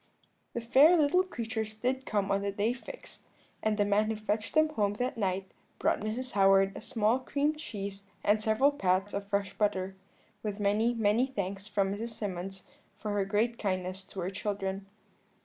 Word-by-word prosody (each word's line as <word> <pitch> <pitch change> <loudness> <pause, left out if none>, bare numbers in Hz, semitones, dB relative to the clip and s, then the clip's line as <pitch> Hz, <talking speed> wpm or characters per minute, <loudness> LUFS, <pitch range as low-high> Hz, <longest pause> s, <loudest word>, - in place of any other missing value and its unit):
"The 235 - -2
fair 275 +9 +6
little 310 +4 +4
creatures 225 -10 -4
did 260 +4 -1
come 200 -2 0
on 195 0 +2
the 200 0 -1
day 210 +4 +1
fixed, 260 - -11 0.3
and 215 -1 +1
the 205 - +3
man 205 +1 +3
who 220 - 0
fetched 215 +2 -2
them 310 0 +5
home 210 -9 0
that 250 +4 -1
night 190 -3 -1 0.3
brought - - +1
Mrs. 235 +5 -3
Howard 195 0 +4
a - - -6
small 225 +2 +1
cream 285 +3 0
cheese 200 -9 -6 0.2
and 210 +1 +3
several 220 +6 +3
pats 190 -5 +1
of 200 0 -3
fresh 200 -1 -1
butter, 190 -2 0 0.5
with 210 -1 -4
many, 215 +4 +2
many 225 +3 +3
thanks 200 -5 -4
from 200 -2 +1
Mrs. 225 +3 -5
Symonds 190 -2 -5 0.3
for 210 0 -4
her 205 -1 +1
great 220 +4 0
kindness 185 -1 -2
to 190 - -7
her 180 +2 -2
children. 195 -1 -3
210 Hz, 180 wpm, -30 LUFS, 195-235 Hz, 0.5 s, fair